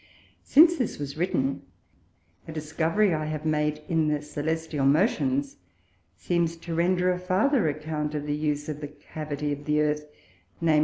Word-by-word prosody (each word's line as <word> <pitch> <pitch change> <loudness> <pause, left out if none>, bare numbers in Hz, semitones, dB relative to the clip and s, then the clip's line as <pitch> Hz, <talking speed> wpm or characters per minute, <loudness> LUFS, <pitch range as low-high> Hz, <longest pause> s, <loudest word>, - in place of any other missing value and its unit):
Since 330 +4 +6
this 250 - -2
was 140 -1 -5
written, 140 -5 0 0.9
a - - -6
Discovery 160 +5 +1
I 155 -1 -1
have 155 0 -4
made 150 -1 0
in 160 -3 +2
the 150 0 +2
Cœlestial 150 0 -2
Motions, 140 - +2 0.6
seems 170 - 0
to 165 0 -6
render 180 +2 +2
a 180 - -2
farther 190 - +2
Account 150 0 -3
of 145 -1 -3
the 145 - -1
Use 150 -1 -1
of 150 -1 -5
the 145 - -4
Cavity 150 0 -5
of 145 0 -8
the 150 0 +2
Earth, 150 0 0 0.5
_viz. 160 -2 +3
155 Hz, 160 wpm, -26 LUFS, 150-170 Hz, 0.9 s, Since